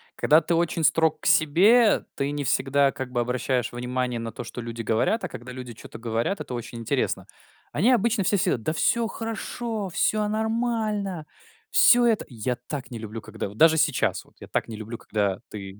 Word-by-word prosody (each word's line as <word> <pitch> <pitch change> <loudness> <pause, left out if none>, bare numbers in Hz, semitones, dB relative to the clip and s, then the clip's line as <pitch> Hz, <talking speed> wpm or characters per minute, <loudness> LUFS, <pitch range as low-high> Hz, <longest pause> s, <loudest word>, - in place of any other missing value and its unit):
Когда 155 +2 +4
ты 170 - 0
очень 165 -1 0
строг 160 +1 +3
к - - -12
себе, 205 +10 +5
ты 140 +1 -1
не 145 -1 -3
всегда 140 +1 +2
как 130 -1 -6
бы 120 - -1
обращаешь 125 0 -1
внимание 125 0 -2
на 115 0 -5
то, 120 - -7
что 120 - -8
люди 115 0 -5
говорят, 115 - +1
а - - -1
когда 125 +2 -9
люди 125 -2 -8
чё-то 110 - -11
говорят- 115 - -1
это 125 - -5
очень 120 0 -6
интересно. 115 - -1 0.4
Они 240 +6 +3
обычно 235 -3 +2
все 200 +3 +2
всё: 150 - +1
"Да 155 +8 -2
всё 235 +7 +2
хорошо, 225 -2 -4
всё 210 +4 +1
нормально, 215 -6 -1 0.4
всё 240 -1 +6
это" 225 -2 +1
Я 125 0 -3
так 130 +2 -7
не 120 - -6
люблю, 110 0 -7
когда 105 -2 -6
вот 105 - -13
даже 160 0 +6
сейчас, 150 -3 +1
вот - - -25
я - - -10
так - - -1
не 115 - -7
люблю, 110 +2 -7
когда 100 -3 -1
ты 100 -1 -8
140 Hz, 200 wpm, -25 LUFS, -, 0.4 s, всё